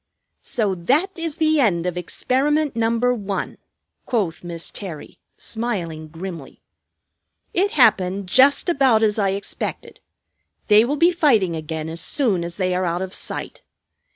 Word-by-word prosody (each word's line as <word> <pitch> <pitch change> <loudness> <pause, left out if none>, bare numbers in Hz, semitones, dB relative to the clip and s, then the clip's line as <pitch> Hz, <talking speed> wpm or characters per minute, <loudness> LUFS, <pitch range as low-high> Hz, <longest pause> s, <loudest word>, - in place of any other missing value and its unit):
"So 210 -5 -1
that 270 - +1
is 330 -3 -4
the 315 -1 +2
end 180 -10 +2
of 180 -1 -2
experiment 275 - 0
number 230 +2 +1
one," 200 -4 -4 0.5
quoth 200 -11 -1
Miss 170 -1 -4
Terry, 175 -7 -8 0.2
smiling 180 -9 -4
grimly. 165 -2 -8 0.9
"It 390 +3 +2
happened 195 -7 +3
just 265 - +4
about 265 -9 +3
as 215 0 +2
I 200 -1 +2
expected. 200 - -6 0.7
They 210 +1 +7
will 290 +4 -1
be 340 +4 +5
fighting 230 - +2
again 155 0 -5
as 165 +1 -4
soon 200 - +1
as 170 0 -6
they 185 -1 0
are 180 +1 0
out 175 +1 -1
of 190 0 -7
sight. - - -6
205 Hz, 145 wpm, -21 LUFS, 175-265 Hz, 0.9 s, They